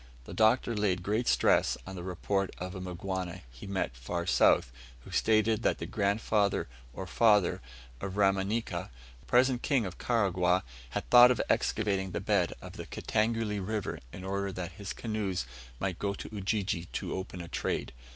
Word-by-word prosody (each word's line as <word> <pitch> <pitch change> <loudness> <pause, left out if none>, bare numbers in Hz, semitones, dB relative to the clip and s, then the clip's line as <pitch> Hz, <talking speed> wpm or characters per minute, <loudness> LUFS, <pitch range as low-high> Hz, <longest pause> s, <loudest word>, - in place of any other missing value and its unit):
The - - -8
Doctor 115 +1 +3
laid 95 -4 0
great 110 +5 0
stress - - +3
on 95 - -7
the 90 - -6
report 95 +2 -1
of 90 +1 -5
a 95 - -6
Mgwana 90 0 -4
he 65 +11 -11
met 95 -10 -2
far 85 +8 -4
south, 75 -7 +4 0.3
who - - -13
stated 110 0 +3
that - - +1
the - - -5
grandfather 100 0 +1 0.2
or 95 - -6
father 105 -1 +3 0.4
of 100 0 -4
Rumanika, 95 -1 +1 0.4
present 125 0 +3
King 135 -7 +2
of 90 -2 -7
Karagwah, 95 -6 +2 0.3
had - - -4
thought 120 0 +10
of 125 - +1
excavating 100 -3 0
the - - -1
bed 100 -3 +1
of - - -9
the - - -7
Kitangule 110 -1 0
River, 105 +1 -3
in 90 - -9
order 100 +1 -2
that 90 0 -5
his 100 +3 -7
canoes 105 - -2 0.3
might 95 -3 -2
go 100 -1 -1
to - - -7
Ujiji 100 -3 -1
to - - -3
open 95 -1 -5
a 85 - -6
trade. - - -2
100 Hz, 170 wpm, -30 LUFS, 90-110 Hz, 0.4 s, thought